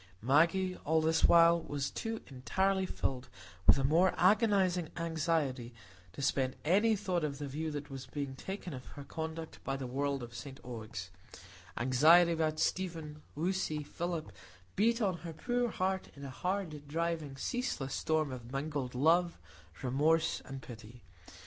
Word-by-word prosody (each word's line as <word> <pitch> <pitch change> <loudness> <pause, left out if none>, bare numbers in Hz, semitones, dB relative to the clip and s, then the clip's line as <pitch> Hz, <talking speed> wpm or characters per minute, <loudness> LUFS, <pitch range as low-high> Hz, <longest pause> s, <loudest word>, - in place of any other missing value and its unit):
Maggie, 165 - +3
all 160 +2 +1
this 160 +1 +3
while, 170 0 +6
was 145 -3 -3
too 225 0 -4
entirely 190 - 0
filled 130 -6 -3 0.4
with - - +8
a 135 - 0
more 165 +7 +4
agonizing 190 -4 +3
anxiety 160 -7 -1 0.4
to 140 - -6
spend 130 -1 +1
any 205 +7 +4
thought 185 -4 -1
on 150 -2 -1
the 145 +1 -6
view 155 +4 -3
that 145 -1 -6
was 135 -1 -7
being 140 0 -4
taken 190 +3 -6
of 130 -1 -7
her 140 - -9
conduct 160 +2 -6
by 135 - -2
the 135 - -5
world 140 +1 -1
of 120 0 -9
St 135 +3 -8
Ogg's; 110 -6 -7 0.7
anxiety 155 +8 +6
about 155 -1 0
Stephen, 160 -5 -2
Lucy, 160 -2 -1
Philip, 170 +1 -4 0.4
beat 230 +3 +3
on 190 -4 +1
her 170 -1 -7
poor 245 +9 0
heart 190 -1 -1
in 140 0 -9
a 135 - -6
hard, 175 -3 -3
driving, 160 -2 -2
ceaseless 135 - -2
storm 155 -3 0
of 125 -1 -8
mingled 135 -2 -3
love, 170 +6 +3 0.5
remorse, 150 +6 +2
and 135 -1 -7
pity. 115 0 -11
155 Hz, 155 wpm, -33 LUFS, 135-175 Hz, 0.7 s, with